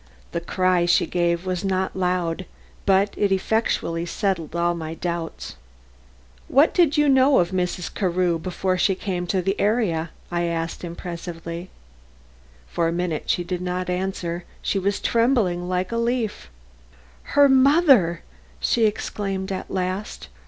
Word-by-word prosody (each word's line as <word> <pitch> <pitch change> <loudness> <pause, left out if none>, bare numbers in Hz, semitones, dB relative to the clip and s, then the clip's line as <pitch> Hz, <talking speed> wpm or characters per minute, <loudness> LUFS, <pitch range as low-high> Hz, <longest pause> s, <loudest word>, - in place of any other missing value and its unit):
The 170 - -2
cry 180 0 +1
she 175 - +4
gave 170 0 0
was 185 0 -2
not 190 -1 -1
loud, 180 -1 -1 0.4
but 195 +1 +3
it 200 -1 +1
effectually 190 -4 0
settled 170 -4 -2
all 170 0 +2
my 160 -1 -5
doubts. 170 -1 -5 0.9
"What 285 +4 +4
did 330 -5 +3
you 295 0 +4
know 265 0 +5
of 175 0 +2
Mrs. 180 -1 -2
Carew 180 -3 +1
before 185 +2 -1
she 190 +2 +3
came 180 -2 -3
to 195 -2 0
?" - - -28
I 175 0 0
asked 165 0 -3
impressively. 170 0 -6 1.0
For 165 - 0
minutes 170 -2 -1
she 175 - -2
did 180 0 -4
not 180 0 -2
answer; 180 -2 -3 0.2
she 195 - 0
was 200 +1 0
trembling 225 -8 +1
like 185 0 -1
a 230 - -1
leaf. 235 - -1 0.9
"Her 285 0 +8
mother!" 265 - +5 0.4
she 220 - +3
exclaimed 195 -2 -3
at 190 - -4
last. 185 - -3
185 Hz, 140 wpm, -23 LUFS, 170-200 Hz, 1.0 s, Her